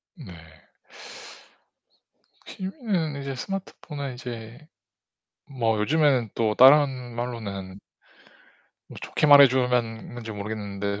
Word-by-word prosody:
네. 90 Hz, -, -11 dB, 2.1 s
취미는 190 Hz, -, -4 dB
이제 140 Hz, -1 st, -5 dB
스마트폰에 145 Hz, -5 st, -6 dB
이제 120 Hz, -2 st, -8 dB, 0.9 s
뭐 115 Hz, -5 st, -1 dB
요즘에는 135 Hz, -1 st, +2 dB
또 110 Hz, -2 st, 0 dB
다른 130 Hz, -3 st, +5 dB
말로는 100 Hz, -6 st, -6 dB, 1.1 s
뭐 -, -, -12 dB
좋게 -, -, -1 dB
말해주면 125 Hz, -5 st, +4 dB
건지 115 Hz, -2 st, -8 dB
모르겠는데 100 Hz, -1 st, -5 dB
125 Hz, 205 characters per minute, -25 LUFS, 110-140 Hz, 2.1 s, 다른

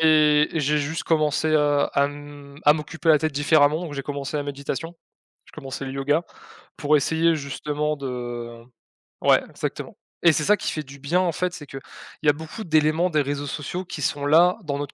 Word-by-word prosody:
Et 150 Hz, -1 st, +5 dB
j'ai 150 Hz, -1 st, +1 dB
juste 150 Hz, +3 st, -3 dB
commencé 155 Hz, 0 st, +1 dB
à 145 Hz, -1 st, +3 dB
à 140 Hz, -, +4 dB
m 145 Hz, -1 st, -10 dB
à 150 Hz, -, +8 dB
m'occuper 160 Hz, +2 st, -4 dB
la 155 Hz, -2 st, +7 dB
tête 155 Hz, +1 st, -1 dB
différemment, 145 Hz, +1 st, +3 dB
donc 165 Hz, -4 st, -6 dB
j'ai 140 Hz, -, -4 dB
commencé 140 Hz, +1 st, -4 dB
la 145 Hz, -, -1 dB
méditation. 145 Hz, +4 st, -5 dB, 0.5 s
J'ai -, -, -19 dB
commencé 135 Hz, -2 st, -6 dB
le 135 Hz, -, -5 dB
yoga 140 Hz, +4 st, +1 dB, 0.6 s
pour 150 Hz, 0 st, +2 dB
essayer 160 Hz, +3 st, +2 dB
justement 150 Hz, +1 st, -3 dB
de 120 Hz, -3 st, -6 dB, 0.6 s
ouais, -, -, +5 dB
exactement. -, -, -5 dB, 0.3 s
Et 170 Hz, -2 st, +6 dB
c'est 150 Hz, -, 0 dB
ça 210 Hz, +6 st, +4 dB
qui -, -, -3 dB
fait 155 Hz, -, -4 dB
du 140 Hz, 0 st, -13 dB
bien 150 Hz, +6 st, +1 dB
en 180 Hz, -2 st, +1 dB
fait, 180 Hz, +2 st, -2 dB
c'est 150 Hz, -, -8 dB
que 135 Hz, -, -8 dB, 0.5 s
il -, -, 0 dB
y -, -, +8 dB
a -, -, +5 dB
beaucoup 160 Hz, +8 st, -8 dB
d'éléments 160 Hz, +1 st, +2 dB
des 155 Hz, -3 st, +2 dB
réseaux 145 Hz, +1 st, -3 dB
sociaux 160 Hz, +6 st, -4 dB
qui 165 Hz, -3 st, -7 dB
sont 140 Hz, +1 st, -1 dB
là, 170 Hz, +4 st, +5 dB
dans 140 Hz, -3 st, -3 dB
notre 145 Hz, -1 st, -5 dB
150 Hz, 205 wpm, -23 LUFS, 140-160 Hz, 0.6 s, à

